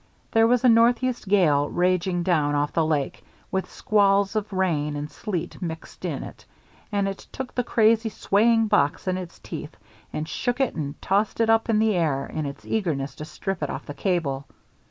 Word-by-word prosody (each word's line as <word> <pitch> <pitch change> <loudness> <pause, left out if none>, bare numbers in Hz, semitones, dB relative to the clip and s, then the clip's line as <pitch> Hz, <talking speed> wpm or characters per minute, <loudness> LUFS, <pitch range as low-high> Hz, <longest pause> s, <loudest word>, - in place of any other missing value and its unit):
There 225 0 +5
was 245 +1 +2
a - - +6
northeast 240 0 +3
gale 155 -8 +3
raging 180 0 +1
down 150 -5 +2
off 145 0 0
the 165 - +2
lake, 150 -3 -1 0.3
with 190 0 -2
squalls 200 0 +2
of 215 -1 -2
rain 160 -6 0
and 145 +1 -5
sleet 180 0 -5
mixed 165 -2 -7
up - - -1
in - - -4
it, - - -11 0.5
and 200 -1 +1
it 195 0 -6
took 265 -1 -6
the 250 - 0
crazy, 225 -1 +3
swaying 225 +2 +3
box 190 -7 +1
in 185 - +1
its 180 -2 -7
teeth 155 -2 -8 0.3
and 155 +1 -3
shook 245 +8 -2
it 270 - +1
and 145 -3 -5
tossed 205 +3 +1
it 225 -1 +4
up 225 +1 +2
in 220 - +3
the 220 0 +3
air 150 -6 0
in 155 -2 -4
its 140 - -8
eagerness 155 -10 -1
to 150 - -6
strip 195 +3 -4
it 150 - -1
off - - -5
the 145 - -6
cable. 145 -7 -1
190 Hz, 195 wpm, -25 LUFS, 155-220 Hz, 0.5 s, a